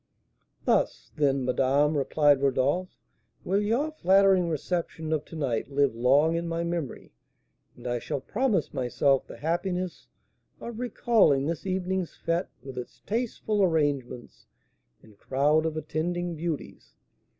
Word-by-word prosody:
"Thus, - - +1
then, 140 -3 +1
madame," 135 +4 +2
replied 145 0 +3
Rodolph, 140 +7 0 0.5
"will 195 +2 +1
your 240 +9 0
flattering 190 - +4
reception 160 0 -2
of 155 - -1
to - - -11
night 135 -5 -1
live 140 -2 +2
long 135 +7 +3
in 170 0 -2
my 165 0 -2
memory; 170 -5 -4 0.6
and 125 - -14
I 120 -1 -1
shall 145 +3 -3
promise 210 - 0
myself 135 +1 +1
the - - -10
happiness 180 +3 -2 0.5
of 235 -1 -7
recalling 220 - +3
this 165 +4 -3
evening's 185 -1 -2
fête, 165 +2 -1 0.2
with 130 -2 -7
its 125 - -10
tasteful 220 -2 -1
arrangements 145 -8 -1 0.6
and 105 -2 -19
crowd 150 +4 +2
of 160 -1 -4
attending 175 +3 -2
beauties. 160 -1 -5
160 Hz, 130 wpm, -27 LUFS, 140-185 Hz, 0.6 s, flattering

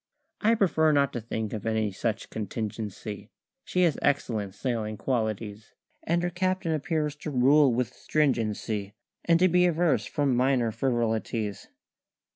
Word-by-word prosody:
I 225 +2 +3
prefer 160 -7 +3
not 140 -2 +2
to 120 - -3
think 110 -1 -4
of 110 - -4
any 110 -2 0
such 110 +3 -3
contingency: 105 0 -5 0.3
She 180 - +1
has 165 -4 +2
excellent 110 -8 0
sailing 110 -3 -2
qualities, 110 -3 -3 0.3
And 170 +1 0
her 175 - -1
captain 185 0 -1
appears 155 -1 -1
to 150 - -6
rule 140 +1 +5
with 125 0 -1
stringency 110 -7 -1 0.3
And 170 -1 +5
to 185 - +5
be 180 0 +4
averse 170 -2 +1
from 145 -4 +1
minor 125 -2 +2
frivolities. 115 -3 -1
125 Hz, 140 wpm, -27 LUFS, 110-155 Hz, 0.3 s, rule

